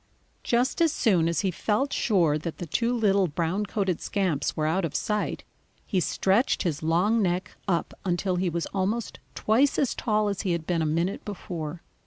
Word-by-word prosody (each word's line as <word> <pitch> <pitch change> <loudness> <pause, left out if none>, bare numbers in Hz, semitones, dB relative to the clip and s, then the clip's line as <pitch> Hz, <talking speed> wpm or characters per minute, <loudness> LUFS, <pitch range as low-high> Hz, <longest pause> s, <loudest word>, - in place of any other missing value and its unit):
Just 245 +6 +1
as 330 -2 +4
soon 190 - +2
as 170 - 0
he 195 -3 0
felt 220 +10 0
sure 170 -9 +2
that 160 +1 -5
the 175 - -5
two 230 +9 0
little 200 -5 +3
brown 170 +6 -1
coated 190 -4 -1
scamps 175 -8 -1
were 155 - +1
out 175 +5 +1
of 165 - -3
sight, 210 -1 -1 0.4
he 195 - 0
stretched 195 +7 +1
his 160 -6 -1
long 180 +8 +2
neck 180 -1 -1
up 175 -3 0
until 180 0 0
he 180 0 +1
was 170 0 -2
almost 200 +4 -1 0.2
twice 250 +6 +2
as 270 - +1
tall 215 -2 0
as 200 -1 -2
he 185 - 0
had 170 -2 -3
been 170 -1 0
a 155 - +1
minute 170 +5 -1
before. 170 -5 -6
190 Hz, 190 wpm, -26 LUFS, 170-210 Hz, 0.4 s, as